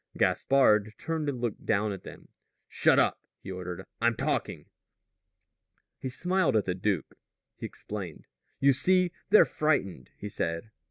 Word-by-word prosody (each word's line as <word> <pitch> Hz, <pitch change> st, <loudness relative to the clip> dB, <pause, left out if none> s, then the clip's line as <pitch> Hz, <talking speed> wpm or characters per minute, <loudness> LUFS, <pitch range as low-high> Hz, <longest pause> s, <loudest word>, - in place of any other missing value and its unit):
Gaspard 110 Hz, -6 st, +3 dB
turned 160 Hz, -2 st, -2 dB
and 130 Hz, -3 st, -4 dB
looked 120 Hz, -3 st, -3 dB
down 105 Hz, +1 st, +1 dB
at 95 Hz, -, -6 dB
them. -, -, -12 dB, 0.4 s
"Shut -, -, +3 dB
up," -, -, +3 dB, 0.2 s
he -, -, -6 dB
ordered; 90 Hz, 0 st, -6 dB, 0.2 s
"I'm 115 Hz, 0 st, +3 dB
talking." -, -, -2 dB, 1.3 s
He 130 Hz, -, -4 dB
smiled 180 Hz, +2 st, +1 dB
at 105 Hz, -, +2 dB
the 90 Hz, -, 0 dB
duke. 95 Hz, -3 st, -2 dB, 0.4 s
He -, -, -6 dB
explained. 95 Hz, -6 st, -8 dB, 0.3 s
"You 140 Hz, 0 st, +5 dB
see, 180 Hz, +6 st, +3 dB, 0.2 s
they're 210 Hz, -, +7 dB
frightened," 120 Hz, -, -1 dB
he 105 Hz, -, -6 dB
said. 85 Hz, +1 st, -3 dB
110 Hz, 145 wpm, -29 LUFS, 95-140 Hz, 1.3 s, they're